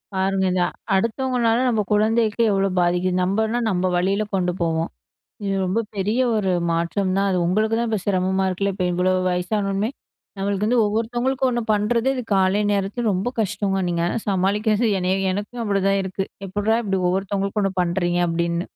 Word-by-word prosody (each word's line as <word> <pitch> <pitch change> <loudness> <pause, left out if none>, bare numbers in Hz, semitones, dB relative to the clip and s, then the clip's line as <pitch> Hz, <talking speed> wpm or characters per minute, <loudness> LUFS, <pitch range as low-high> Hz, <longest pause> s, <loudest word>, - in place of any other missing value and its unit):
பாருங்க 190 0 +1
இத 180 -1 +1 0.3
அடுத்தவங்களால, 230 +2 +1
நம்ம 220 -3 +1
குழந்தைக்கு 220 +1 +2
எவ்வளோ 195 0 +1
பாதிக்குது. 180 +1 +1
நம்மன்னா 220 +5 0
நம்ம 180 -1 0
வழியில, 195 +4 +1
கொண்டு 180 -1 +1
போவோம். 165 -1 0 0.6
இது 195 - 0
ரொம்ப 190 +5 0 0.2
பெரிய, 210 +5 0 0.2
ஒரு 195 -3 +1 0.2
மாற்றம் 185 +3 0
தான். 200 0 +2
அது 180 - +1
உங்களுக்குதா, 220 +5 +1
இப்ப 215 -3 0
சிரமமா 190 -1 +1
இருக்குல்ல. 195 +1 -1
இப்ப, 180 -3 -1
இவ்ளோ 185 +1 +2 0.2
வயசானவுனே 195 +3 -1 0.5
நம்மளுக்கு 200 +1 -1
வந்து 245 0 +3
ஒவ்வொருத்தவங்களுக்கும், 240 +5 0
ஒண்ணு 240 0 -1
பண்ணுறது, 230 +4 +1
இது 250 - -2
காலை 190 +2 +3
நேரத்தில 200 +4 -1
ரொம்ப 195 +7 -1
கஷ்டங்க. 200 -2 0
நீங்க 170 -1 0 0.2
சமாளிக்கிறது 205 +4 +1
என்னய, 185 +1 +1
எனக்கும் 210 +5 -4
அப்டிதான் 195 -1 +1
இருக்கு. 190 +1 -3 0.2
எப்பிட்றா 205 +4 0
இப்டி 195 -2 0
ஒவ்வொருத்தவங்களுக்கும் 195 +2 -1
ஒண்ணு 195 -1 0
பண்றீங்க? 175 0 0
அப்டினு. 170 0 -1
195 Hz, 155 wpm, -22 LUFS, 185-220 Hz, 0.6 s, வந்து